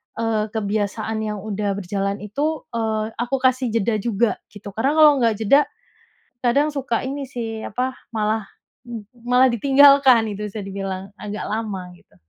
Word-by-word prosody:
eee, 220 -2 0
kebiasaan 215 +1 -1
yang 210 -1 -3
udah 205 -2 -2
berjalan 200 +1 -3
itu, 290 +9 -2
eee, 220 -2 -1
aku 245 +3 0
kasih 255 0 +3
jeda 220 0 +1
juga 230 +1 0
gitu 205 -1 -10
karena 265 +9 0
kalau 305 -1 +8
nggak 230 -3 +2
jeda 280 +7 +5 0.8
kadang 280 +5 +3
suka 260 -2 -1
ini 280 +1 -4
sih 230 -4 -5
apa, 255 +4 -2 0.2
malah 215 -1 0 0.4
m 230 -3 -6 0.2
malah 250 +1 +5
ditinggalkan 270 -1 +6
itu 210 - -6
bisa 215 - -6
dibilang, 195 -1 -5
agak 210 0 -5
lama 205 -5 -4
gitu. 175 - -25
220 Hz, 150 wpm, -22 LUFS, 205-255 Hz, 0.8 s, kalau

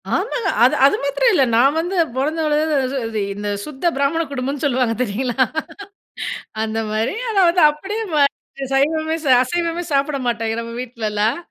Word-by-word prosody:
ஆமாங்க! 435 0 -1
அது 255 - +5
அது 280 - +5
மாத்திரம் 455 - +2
இல்ல. 275 - +4
நான் 270 +6 +4
வந்து 355 +3 -2 0.2
பொறந்து 305 +5 -1
வளந்தது 295 -3 +1
இது 220 -2 -3
இந்த, 205 +1 -5 0.2
சுத்த 305 +4 -1
பிராமண 285 +4 +1
குடும்பம்னு 275 +2 -3
சொல்லுவாங்க 250 -4 +1
தெரியுங்களா? 250 +4 0 1.2
அந்த 220 0 -3
மாரி. 220 - -1
ஆனா 395 -3 +2
வந்து 350 +1 +2
அப்படியே 405 +9 -5
மாறிட்டேன். 275 -1 -1
சைவமே 315 +3 +1
சா 265 - +3
அசைவமே 340 +4 -2
சாப்பிட 280 +1 +1
மாட்டாய்ங்க 225 -1 -1
நம்ம 230 0 -7
வீட்லலாம். 220 -2 -1
275 Hz, 150 wpm, -20 LUFS, 240-320 Hz, 1.2 s, அது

